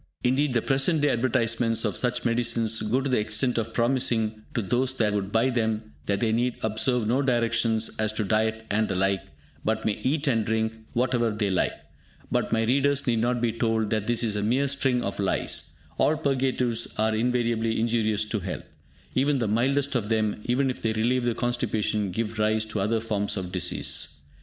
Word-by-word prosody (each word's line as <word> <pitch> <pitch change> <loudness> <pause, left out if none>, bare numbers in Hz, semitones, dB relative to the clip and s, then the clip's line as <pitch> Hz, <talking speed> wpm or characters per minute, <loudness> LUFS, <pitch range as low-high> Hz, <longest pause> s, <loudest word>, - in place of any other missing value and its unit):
Indeed 130 +1 +1
the 115 - +2
present 140 +4 +2
day 145 - +3
advertisments 115 -1 +1
of 105 -4 -1
such 125 -1 0
medicines 115 -2 +1
go 115 +5 +1
to 135 - -2
the 130 -4 +2
extent 115 +4 +1
of 115 - -3
promising 115 -3 +1
to 115 - 0
those 125 +6 +1
that 110 -5 +1
would 100 -1 -2
buy 115 +4 +2
them 110 -2 -1
that 100 -1 0
they 115 - +2
need 120 +2 +1
observe 110 +2 +1
no 125 +5 +2
directions 115 -3 +1
as 110 -1 +2
to 110 - -1
diet 110 +2 0
and 110 +1 +2
the 95 - -2
like, 95 +1 +1 0.4
but 110 0 -1
may 110 - +3
eat 140 +4 0
and 115 -5 +2
drink 110 +1 -1 0.2
whatever 120 -1 +1
they 105 -2 -1
like. 95 - +1 0.6
But - - 0
my 115 0 +2
readers 140 +4 +2
need 115 -3 +1
not 120 +1 0
be 115 -2 +1
told 110 -2 0
that 110 -2 -1
this 120 0 +2
is 110 -3 0
a 105 - -1
mere 125 +7 +1
string 130 -3 0
of 100 - -4
lies. 100 -1 -2 0.3
All 155 - +3
purgatives 130 -5 0
are 110 0 +1
invariably 115 -1 0
injurious 110 -2 +1
to 110 - 0
health. 95 0 -5 0.5
Even 140 +2 +2
the 115 -4 0
mildest 135 +6 +1
of 115 -5 -1
them, 110 -2 0
even 130 +2 +1
if - - -9
they 110 -1 0
relieve 120 +3 +1
the 120 -2 0
constipation, 110 -4 -1
give 110 +3 -3
rise 110 0 +2
to 110 -1 -3
other 110 +3 0
forms 105 -2 -2
of 90 -2 -4
disease. 90 -4 -2
115 Hz, 195 wpm, -26 LUFS, 110-125 Hz, 0.6 s, day